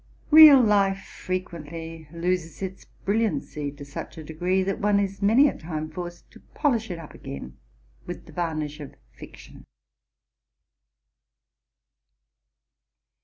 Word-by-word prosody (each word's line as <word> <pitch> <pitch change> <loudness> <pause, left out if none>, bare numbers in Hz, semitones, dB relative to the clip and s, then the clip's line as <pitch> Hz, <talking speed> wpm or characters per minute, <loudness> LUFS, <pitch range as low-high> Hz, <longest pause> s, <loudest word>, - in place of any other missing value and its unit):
Real 305 -3 +11
life 200 -4 +3
frequently 165 -3 -6
loses 170 +1 -2
its 190 0 -6 0.2
brilliancy 200 -9 -1
to 145 -1 -10
such 140 +3 -8
a 160 - -7
degree, 180 +5 0
that 195 +1 -2
one 205 0 +3
is 195 0 -2
many 225 +8 +5
a - - -2
time 155 -1 -5
forced 175 +1 -8
to - - -15 0.2
polish 235 -7 +1
it 175 - -4
up 165 -2 -10
again 65 -2 -8 0.5
with - - -7
the - - -14
varnish 155 -3 -3
of 145 -3 -9 0.2
fiction. - - -13
175 Hz, 120 wpm, -25 LUFS, 155-200 Hz, 0.5 s, Real